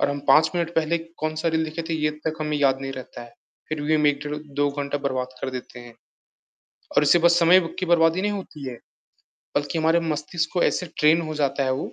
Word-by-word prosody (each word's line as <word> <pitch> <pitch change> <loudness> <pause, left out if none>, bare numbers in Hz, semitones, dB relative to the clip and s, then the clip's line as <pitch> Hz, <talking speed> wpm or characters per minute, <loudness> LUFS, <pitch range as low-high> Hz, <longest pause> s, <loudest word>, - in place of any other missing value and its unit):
और - - +2
हम 145 - -3
5 155 +3 +6
मिनट 170 -1 -2
पहले 165 +1 +1
कौन-सा 160 -1 -3
रील 160 0 +2
देखे 160 +2 -5
थे 165 - -1
ये 150 - +2
तक 160 -1 -1
हमें 150 -1 -1
याद 135 -2 +2
नहीं 135 0 -5
रहता 130 -2 -9
है। 120 - -13 0.4
फ़िर 155 -1 -3
भी 155 +2 +1
हम 150 -1 +3
1, 145 -1 +2
डेढ़, 150 0 -4
2 145 -1 -2
घंटा 145 0 -3
बर्बाद 130 -2 -3
कर 130 - -3
देते 125 -1 -8
हैं। 120 -1 -13 1.0
और - - +6
उससे 150 +4 +5
बस 170 +1 +4
समय 175 +2 +6 0.2
की 185 - -1
बर्बादी 170 +1 +3
नहीं 210 +1 0
होती 165 -8 -7
है। 125 - -6 0.8
बल्कि 145 +3 -1
हमारे 160 +2 +3
मस्तिष्क 160 +1 -2
को 180 - +1
ऐसे 180 - +1
ट्रेन 155 +2 +5
हो 155 -1 -5
जाता 140 -1 0
है 130 - +1
वो। 130 - -4
155 Hz, 230 wpm, -24 LUFS, 140-165 Hz, 1.0 s, 5